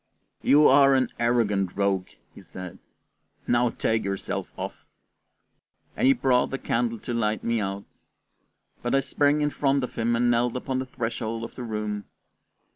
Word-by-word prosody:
"You 150 +1 +6
are 135 0 +6
an 130 -1 +1
arrant 105 -6 +1
rogue," 100 -2 +1 0.3
he - - -13
said; 90 -2 -9 0.7
"now 120 0 +2
take 110 -1 -1
yourself 100 -1 -4
off," - - -6 1.1
and - - +2
he 135 - +7
brought 125 0 +2
the 135 - -3
candle 115 -2 -1
to 120 - -5
light 110 -2 0
me 115 -1 0
out. 100 0 -4 1.0
But 120 +2 0
I - - +5
sprang 145 +2 +1
in 150 0 +1
front 140 -2 +1
of 125 - -4
him 115 +1 +1
and 120 +1 +2
knelt 120 +1 +1
upon 130 +1 -2
the 130 - -4
threshold 115 -2 -4
of - - -7
the - - -8
room. 105 -3 -4
120 Hz, 165 wpm, -26 LUFS, 105-130 Hz, 1.1 s, he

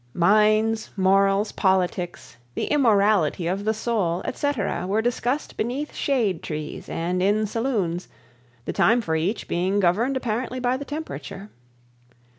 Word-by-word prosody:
Mines, 215 +4 +3
morals, 195 +2 +3
politics, 180 - -1 0.2
the - - -1
immortality 205 - +3
of 190 +4 -2
the 220 - +2
soul, 205 -6 -1
etc., 205 -11 -2
were 205 +3 +1
discussed 245 +4 -1
beneath 265 +6 -3
shade 225 - 0
trees 155 -1 -6
and 180 +2 -2
in 205 +3 +2
saloons, 205 -6 -2 0.6
the - - -3
time 235 +3 +4
for 160 -7 -1
each 180 +8 -1
being 185 +4 0
governed 215 +9 +2
apparently 245 +1 -3
by 250 0 +1
the 280 +2 -5
temperature. 205 - -7
205 Hz, 130 wpm, -24 LUFS, 180-235 Hz, 0.6 s, time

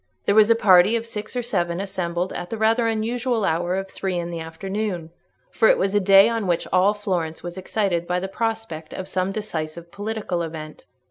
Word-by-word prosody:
There - - +3
was 215 +1 +6
a 230 - +6
party 195 0 +5
of 230 0 -2
six 215 0 -6
or 245 - -1
seven 175 -7 -1
assembled 185 -2 -3
at 175 - -5
the 225 - -4
rather 225 +2 +2
unusual 225 +1 0
hour 175 +3 0
of 195 0 -3
three 190 -1 -3
in 170 0 -3
the 170 - -4
afternoon; 175 +1 -4 0.4
for 225 - +3
it - - +5
was 195 +1 0
a 205 - +4
day 195 +1 +7
on 230 -4 -1
which 175 -2 0
all 190 +3 +4
Florence 180 -7 -3
was 175 0 -6
excited 190 -2 -1
by 180 0 0
the 190 - -3
prospect 220 -7 -4
of 185 - -5
some 185 0 -1
decisive 170 -5 -5
political 205 -4 -3
event. 155 -2 -7
190 Hz, 205 wpm, -23 LUFS, 175-220 Hz, 0.4 s, day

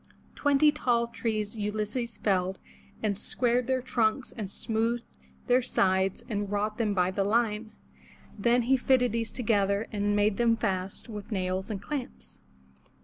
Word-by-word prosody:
Twenty 290 +1 +4
tall 240 -5 +1
trees 220 -2 -3
Ulysses 215 +2 -3
felled, 190 -2 0 0.5
and 210 -2 +1
squared 240 +4 0
their 260 -1 0
trunks 240 0 0
and 210 -5 -5
smoothed 230 +3 -1 0.4
their 250 +1 +4
sides 190 -5 +1
and 205 -2 -2
wrought 210 +2 -1
them 210 -3 +1
by 180 0 +2
the 195 +1 0
line. 215 +1 0 0.6
Then 235 +4 +2
he 265 +3 +3
fitted 250 -1 +3
these 230 0 -2
together 205 -3 +1
and 205 -1 0
made 205 0 +2
them 230 -1 +3
fast 190 -4 -2
with 210 -1 -8
nails 185 0 -2
and 205 -3 -3
clamps. 280 -4 -6
215 Hz, 145 wpm, -28 LUFS, 200-240 Hz, 0.6 s, Twenty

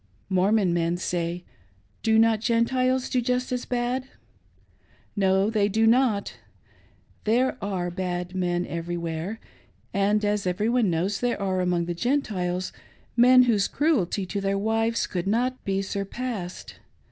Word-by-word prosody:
Mormon 190 0 +2
men 170 0 0
say, 175 0 -3 0.6
"Do 220 -1 +3
not 225 -1 +4
the 220 - -8
Gentiles 255 +2 +1
do 255 - 0
just 250 +1 -1
as 250 -1 -2
bad.'" 245 +1 -1 1.1
No; 195 +1 +2
they 210 -2 +2
do 220 +2 +2
not! 230 -3 +2 0.9
There 245 +4 +2
are 185 -3 -2
bad 180 -1 -3
men 175 -1 -1
everywhere, 170 +3 -4 0.5
and, 200 +2 +2
a^ 210 -2 -1
every 195 +5 0
one 240 -4 +2
knows, 180 +4 0
there 245 -2 -1
are 190 -2 0
among 175 -1 0
the 175 - -2
Gentiles 185 -6 -1 0.4
men 250 +1 +7
whose 220 -5 +2
cruelty 230 - 0
to 200 +2 -3
their 195 0 0
wives 225 +2 0
could 180 0 -4
not 250 +5 0
be 195 0 0
surpassed. 200 -1 -5
200 Hz, 140 wpm, -25 LUFS, 180-235 Hz, 1.1 s, men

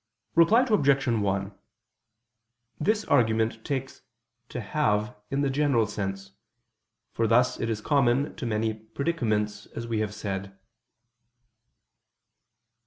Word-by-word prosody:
Reply 210 +10 +5
Obj. 140 - +3
1: 100 -4 0 1.3
This 210 +7 +1
argument 110 -3 +2
takes 135 -2 -4 0.5
"to - - -5
have" 105 -2 0
in 140 +1 0
the 140 - +1
general 135 -5 +2
sense: 95 -2 -5 0.8
for 115 - 0
thus 125 +3 +3
it 115 - -1
is 110 -2 -2
common 140 +1 +2
to 135 -7 -4
many 110 0 0
predicaments, 110 -3 -2
as 115 - -4
we 115 -2 -1
have 105 -1 -2
said. 100 -1 -5
115 Hz, 110 wpm, -27 LUFS, 105-140 Hz, 1.3 s, Reply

